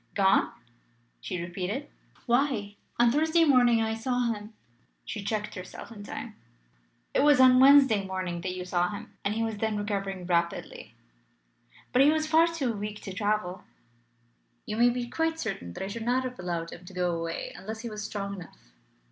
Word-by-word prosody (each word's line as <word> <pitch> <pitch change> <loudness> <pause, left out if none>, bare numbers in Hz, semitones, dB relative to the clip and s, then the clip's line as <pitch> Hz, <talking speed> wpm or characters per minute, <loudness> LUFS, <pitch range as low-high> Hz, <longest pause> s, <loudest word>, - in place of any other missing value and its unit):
"Gone?" 195 -1 +3 0.7
she 180 - -4
repeated. 185 +10 -4 0.4
"Why, 240 -5 +1 0.2
on 235 0 +5
Thursday 320 +4 +3
morning 245 -5 +5
I 220 0 -1
saw 245 +3 -1
him 210 +1 -9 0.3
" - - -41
She 210 - -5
checked 210 0 -2
herself 185 +4 -9
in 215 -3 -10
time. 220 +2 -7 0.8
"It - - +2
was 290 -2 +5
on 255 -1 +7
Wednesday 265 -6 +7
morning 185 -2 -4
that 185 +1 -3
you 180 0 -5
saw 180 -1 +1
him, 205 - -8
and 205 +1 0
he 225 - 0
was 225 -2 -2
then 220 -1 0
recovering 195 -3 -3
rapidly." 170 -1 -2 1.0
"But 250 - +5
he 280 - +7
was 310 0 +2
far 320 +2 +5
too 295 -8 -1
weak 210 0 -5
to 195 - -7
travel." 190 -2 -1 1.0
"You 215 - -4
may 240 +1 +6
be 245 0 -2
quite 325 +4 -1
certain 195 - -4
that - - -5
I - - -3
should 225 +4 -5
not 245 +3 +1
have 250 -3 -6
allowed 170 -2 -3
him 175 - -10
to 190 - -11
go 180 -1 0
away 165 0 -4
unless 220 +2 -7
he 235 - -5
was 210 0 -5
strong 200 -1 -4
enough." 175 - -13
215 Hz, 185 wpm, -28 LUFS, 190-250 Hz, 1.0 s, on